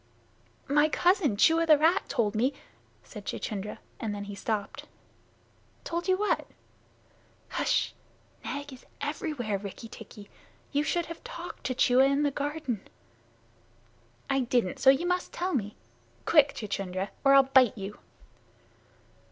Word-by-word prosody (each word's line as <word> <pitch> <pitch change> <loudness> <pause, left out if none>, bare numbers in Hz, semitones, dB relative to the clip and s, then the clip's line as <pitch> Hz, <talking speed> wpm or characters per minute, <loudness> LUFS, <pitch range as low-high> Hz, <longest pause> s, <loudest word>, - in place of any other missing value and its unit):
"My 295 +2 +4
cousin 350 - +2
Chua, 330 +7 +4
the 305 -2 +7
rat, 330 +6 +2
told 220 -6 +1
me 245 +6 +1 0.2
" - - -35
said - - -10
Chuchundra, 210 -2 -4 0.2
and 215 -2 -3
then 200 - -5
he 205 0 -7
stopped. 205 +1 -4 1.0
"Told 340 +2 -3
you 375 0 +3
what?" 420 +1 0 1.0
"H'sh! - - +1 0.5
Nag 285 0 -5
is 255 - -14
everywhere, 285 -8 -2
Rikki 200 +3 -8
tikki. 210 -2 -12 0.4
You 285 - +2
should 340 +3 0
have 335 - -9
talked 485 +2 -8
to 255 - -1
Chua 255 +2 +5
in 280 +1 +2
the 290 - +2
garden." 285 -6 -3 1.5
"I 270 - +1
didn't 240 -6 0
so 265 - +6
you 275 +6 +4
must 360 0 -1
tell 365 +2 -2
me. 210 -6 -2 0.5
Quick, 295 -3 +5
Chuchundra, 195 -2 -3
or 275 0 +6
I'll 275 - +8
bite 255 -5 +6
you!" 200 +1 -7
270 Hz, 140 wpm, -28 LUFS, 210-310 Hz, 1.5 s, I'll